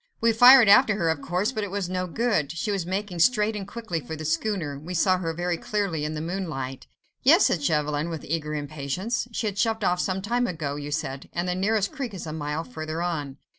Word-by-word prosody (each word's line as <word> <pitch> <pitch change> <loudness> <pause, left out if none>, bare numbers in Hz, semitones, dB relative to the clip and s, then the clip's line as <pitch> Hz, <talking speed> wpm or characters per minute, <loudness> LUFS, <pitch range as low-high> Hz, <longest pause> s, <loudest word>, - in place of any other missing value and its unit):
We 230 0 +3
fired 245 +1 +8
after 210 +1 +6
her, 165 -5 +1
but 145 - -12
of - - -12
course, 180 +6 +1
it 210 -2 -2
was 195 -1 -2
no 185 0 -2
good. 205 - 0
She 165 +5 -2
was 190 -4 -2
making 190 -1 -3
straight 210 +3 +3
and 200 -2 -5
quickly 220 -6 -4
for 155 +2 -7
the 155 0 -7
schooner. 165 -3 -1
We 175 +5 -6
saw 185 +2 +3
her 165 -2 -2
very 175 +1 -2
clearly 185 -6 -2
in 155 +1 -3
the 155 - -3
moonlight." 160 -7 -4 0.3
"Yes," 325 +9 +6
said 165 - +1
Chauvelin, 150 +1 0
with 160 -3 -6
eager 155 -1 -2
impatience, 150 - -3
"she 230 - -3
had 200 -2 -2
shoved 225 -1 +1
off 180 -1 +2
some 190 +1 -1
time 240 +3 0
ago, 155 -6 -3
you 145 0 -6
said, 135 -2 -4
and 175 +1 -2
the 180 - 0
nearest 200 +2 0
creek 245 -7 -5
is 180 - -6
a 155 - -5
mile 150 +1 -3
further 160 -7 -5
on." 145 -6 -3
180 Hz, 230 wpm, -25 LUFS, 155-210 Hz, 0.3 s, fired